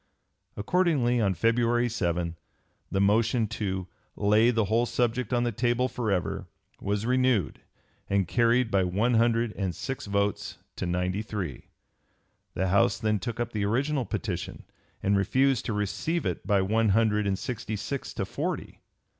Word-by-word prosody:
Accordingly 125 - +2
on 100 -3 +1
February 120 +5 +2
7 85 -6 -1 0.6
the 95 - 0
motion 110 +3 +3
to 95 -4 -3 0.3
"lay 105 +3 +4
the 115 -3 +2
whole 115 +4 +1
subject 120 0 0
on 120 -1 +2
the 120 - 0
table 120 +3 +1
forever" 100 -6 -2 0.3
was 100 +1 -1
(p. - - -4
288) - - -1 0.2
renewed 105 - 0 0.5
and 100 -2 +1
carried 120 +2 +2
by 95 -1 +3
one 100 +7 +1
hundred 115 -1 +2
and 95 -4 -2
six 135 -5 -5
votes 100 0 -1 0.2
to 90 - -2
ninety 90 +3 -1
three. 100 - -5 0.9
The 95 +1 0
House 100 +1 +3
then 105 0 0
took 120 +1 -5
up 120 0 -2
the 105 -3 -1
original 135 +5 0
petition - - -4 0.4
and 100 +1 +3
refused 130 +6 +2
to 115 - -1
receive 105 - -1
it - - -3
by 100 -3 +3
one 110 +3 +2
hundred 105 0 +2
and 95 -1 0
sixty 110 +1 -4
six 135 +6 -4
to - - -2
forty. - - -4
110 Hz, 160 wpm, -27 LUFS, 100-120 Hz, 0.9 s, lay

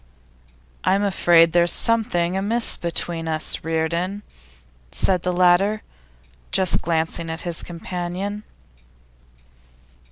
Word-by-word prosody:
'I'm 195 +2 +2
afraid 170 -4 +4
there's 175 0 +4
something 210 -7 +1
amiss 220 +5 +1
between 170 -1 -2
us, 155 -1 -1
Reardon,' 170 +5 -2 0.7
said 180 - +1
the 180 - -1
latter, 180 +4 +3 0.7
just 185 -2 +2
glancing 165 0 -2
at 160 +1 -5
his 170 -2 0
companion. 180 +4 -5
175 Hz, 95 wpm, -22 LUFS, 165-195 Hz, 0.7 s, afraid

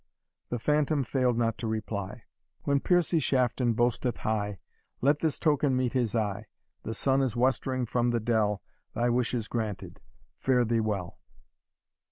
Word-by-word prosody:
The 120 - -1
phantom 150 +3 +1
failed 125 -1 +1
not 115 -1 0
to 115 - -3
reply, 110 -1 -4 0.4
"When 140 0 +2
Piercie 175 +1 +2
Shafton 125 -3 +1
boasteth 120 +1 0
high, 105 -2 -2 0.4
Let 145 +3 +3
this 160 -3 0
token 145 -3 +2
meet 130 -2 0
his 120 -4 0
eye. 105 -1 -1 0.3
The 110 - -4
sun 135 0 +2
is 130 -4 0
westering 130 +1 +1
from 120 +1 +1
the 120 -1 +1
dell, 110 -3 +1 0.3
Thy 120 +1 +2
wish 125 +1 +1
is 115 -3 -2
granted 110 -4 -4 0.4
fare 125 -2 +3
thee 115 0 +1
well!" 100 -5 -3
120 Hz, 155 wpm, -28 LUFS, 110-130 Hz, 0.4 s, Let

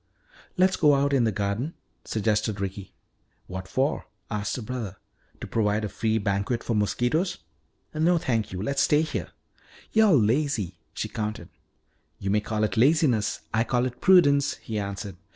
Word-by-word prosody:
"Let's 185 +1 +3
go 150 -3 +5
out 140 +1 +1
in 130 -4 +3
the 110 - +2
garden," 105 - -2 0.3
suggested 110 -1 0
Ricky. 100 0 -5 0.5
"What 95 0 -7
for?" 135 +8 -1 0.2
asked 105 -1 -2
her 125 - -5
brother. 110 -5 -5 0.4
"To - - -4
provide 105 -1 0
a - - -4
free 110 +1 0
banquet 100 +3 -1
for 115 - -1
mosquitoes? 120 - 0 0.6
No, 165 +3 +3
thank 115 -9 -1
you, 90 +1 -4
let's 140 +4 0
stay 150 +3 +4
here." 155 - -4 0.6
"You're 220 -3 +5
lazy," 115 - +1 0.2
she - - -2
countered. 110 -1 -4 0.7
"You 95 - -2
may 105 +1 +2
call 110 0 -2
it 105 -2 -1
laziness; 130 -4 +3
I 110 +1 +3
call 120 +1 0
it 125 -1 -5
prudence," 145 -7 +5
he 110 -2 -5
answered. 100 -1 -5
115 Hz, 160 wpm, -26 LUFS, 105-140 Hz, 0.7 s, go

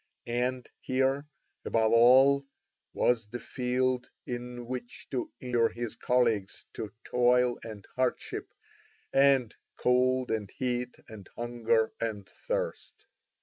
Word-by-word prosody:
And 125 +1 -1
here, 135 +2 0 0.4
above 110 -1 +2
all, 135 +4 +6 0.4
was 115 -3 +1
the 120 +2 -5
field 125 0 -1 0.2
in 120 0 -5
which 125 0 -6
to 130 -3 -2
inure 120 -2 +2
his 120 -2 -5
colleagues 115 -6 +1
to 105 - -5
toil 125 0 +3
and 110 -3 -9
hardship 130 -1 -2 0.6
and 135 -4 +4 0.2
cold 125 0 +2
and 105 -3 -2
heat 125 -1 -2
and 105 -4 -11
hunger 115 -1 +1
and 105 -4 -3
thirst. - - -4
125 Hz, 110 wpm, -29 LUFS, 115-130 Hz, 0.6 s, all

